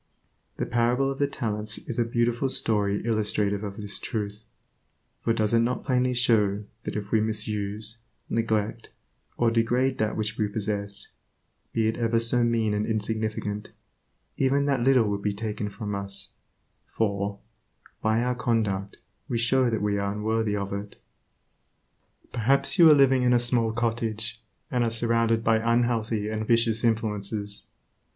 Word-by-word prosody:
The - - -1
parable 120 +3 +1
of 135 - -6
the 140 - +3
talents 110 -5 -1
is 120 - -5
a - - +4
beautiful 120 +3 0
story 105 -4 +1
illustrative 105 -2 0
of 100 -1 -6
this 105 -1 -2
truth, 105 0 -4 0.8
for 115 - +2
does 110 -1 +1
it 115 - +5
not 120 +1 0
plainly 125 -1 +1
show 105 -4 +2 0.2
that - - -4
if 105 -1 -4
we 110 - +3
misuse, 105 0 -3 0.3
neglect, 115 0 -1 0.5
or 120 -1 +3
degrade 120 +3 +1
that 110 0 0
which 110 0 -2
we 105 - +2
possess, 100 -1 -3 0.6
be 110 -1 +1
it 110 - -1
ever 115 -1 +1
so 115 +1 +4
mean 115 -2 +1
and 105 +1 -1
insignificant, 110 -1 -3 0.6
even 140 +1 +2
that 140 -3 +1
little 125 -3 +4
will 100 -1 -1
be 100 0 -1
taken 105 -1 -3
from 105 0 -5
us, 100 0 -3 0.6
for, 100 -2 -1 0.6
by 110 +2 +2
our 125 0 +1
conduct 110 -5 -1 0.3
we 120 - 0
show 125 +2 +3
that 110 -2 -1
we 100 -1 +1
are 100 0 -1
unworthy 110 0 0
of 100 -1 -3
it. 100 0 -6 1.3
Perhaps 135 - +1
you 165 -2 +9
are 150 - +8
living 135 -2 +5
in 125 0 +3
a 120 - +5
small 120 -2 +2
cottage, 115 -1 -2 0.3
and 125 -1 +2
are 115 - +1
surrounded 115 0 +1
by 115 0 +4
unhealthy 115 -2 +1
and 110 0 -3
vicious 115 -1 +2
influences. 105 -2 -2
110 Hz, 155 wpm, -26 LUFS, 105-120 Hz, 1.3 s, you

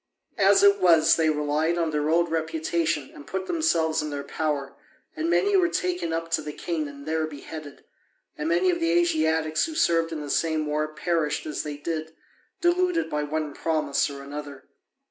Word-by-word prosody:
As 390 - +5
it 400 0 +6
was, 165 -3 +5
they 160 -1 +2
relied 150 +2 0
on 165 -2 0
their 150 0 0
old 170 +1 +2
reputation 160 -2 -1
and 145 - -12
put 190 +2 -3
themselves 170 - +1
in 150 - -4
their 145 -1 -4
power, 145 -3 -2 0.4
and 320 +1 -1
many 400 +3 +3
were 365 -2 +4
taken 355 - -1
up 165 0 -3
to 155 - +1
the 150 0 -6
king 155 0 -3
and 140 0 -11
there 160 0 -1
beheaded. 150 0 -9 0.5
And 150 +2 -3
many 175 +2 +3
of 170 - -2
the 165 - +1
Asiatics 160 - +2
who 320 - -7
served 165 - +2
in 155 -2 -4
the 145 - -4
same 160 -2 +1
war 150 +1 -1
perished 155 -1 -1
as 150 - -3
they 150 -1 -5
did, 160 +1 -4 0.5
deluded 350 0 +1
by 150 - 0
one 150 0 -3
promise 155 -3 0
or 140 -1 -8
another. 145 0 -8
160 Hz, 185 wpm, -25 LUFS, 150-170 Hz, 0.5 s, it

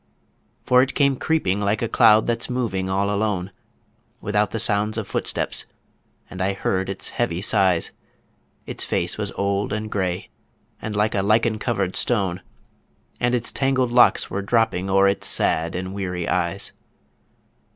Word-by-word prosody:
For 125 0 +5
it 130 - -1
came 140 -2 +3
creeping 115 -10 0
like 100 +2 0
a - - +1
cloud 110 -2 +5
that's 120 0 -1
moving 105 -7 -2
all 100 +1 0
alone, 100 -3 -1 0.7
Without 105 0 0
the - - -4
sound 105 0 0
of 110 -3 -3
footsteps... - - -2 0.6
and 95 - -7
I 95 +1 +1
heard 95 -1 -1
its 95 - -4
heavy 115 -8 -1
sighs... 95 -4 +2 0.7
Its - - -3
face - - -2
was - - -2
old 100 0 -1
and 110 0 -3
grey, 95 -2 -2 0.5
and 110 -1 -4
like 105 +1 +1
a 100 - +1
lichen 110 +2 +2
covered 100 -6 -1
stone, 95 -6 0 0.8
And 120 +1 +1
its 120 -1 +1
tangled 130 -2 +1
locks 120 0 +4
were 100 - -3
dropping 100 -3 +1
o'er 95 +1 +4
its 100 - 0
sad 80 +1 +1
and 95 +1 -4
weary 90 -3 -3
eyes. 90 +2 -1
100 Hz, 155 wpm, -22 LUFS, 95-115 Hz, 0.8 s, For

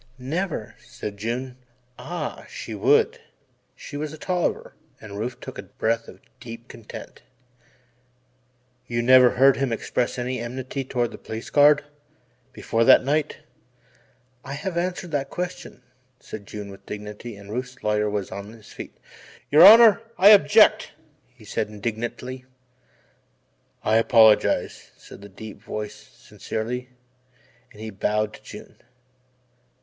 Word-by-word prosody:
"Never," 140 - -4
said 100 -1 -8
June. 125 +4 -4 0.4
Ah, 175 +2 -6
she - - -7
would 455 +2 +2 0.6
she 145 - -9
was 150 0 -4
a 155 - -9
Tolliver 180 +2 -2 0.3
and 100 -1 -9
Rufe 120 +3 -4
took - - -9
a - - -3
breath 115 +1 -2
of - - -14 0.2
deep 115 0 -10
content. 115 -3 -11 1.7
"You 120 0 -1
never 125 0 +7
heard 135 +1 +6
him 135 -3 -1
express 120 +2 -2
any 125 0 -3
enmity 130 +3 -5
toward 120 -2 -1
the - - -10
Police 110 +1 -7
Guard 145 0 +5 0.7
before 115 0 -1
that - - +7
night?" 145 +3 -1 1.0
"I 140 - -7
have 170 +6 -4
answered 175 0 -3
that 140 -2 -2
question," 180 0 -6 0.4
said 100 -2 -10
June 105 -1 -7
with 100 0 -15
dignity 105 +2 -7
and 100 0 -12
Rufe's 125 +2 -6
lawyer 105 0 +1
was 105 -2 -3
on 100 +2 -8
his 110 -3 -15
feet. - - -10 0.5
"Your 150 +3 +8
Honour, 225 +2 +9 0.2
I 195 +3 +7
object," 200 -8 +6 0.3
he - - -19
said - - -2
indignantly. 120 +4 -5 1.4
"I 110 +1 +3
apologize," 115 -2 +3
said - - -14
the 100 - -11
deep 105 +1 -11
voice 105 -1 -5 0.2
"sincerely," 125 +3 -5 0.8
and 105 - -17
he 110 0 -6
bowed 105 +2 -1
to - - -13
June. - - -12
120 Hz, 135 wpm, -24 LUFS, 110-145 Hz, 1.7 s, Honour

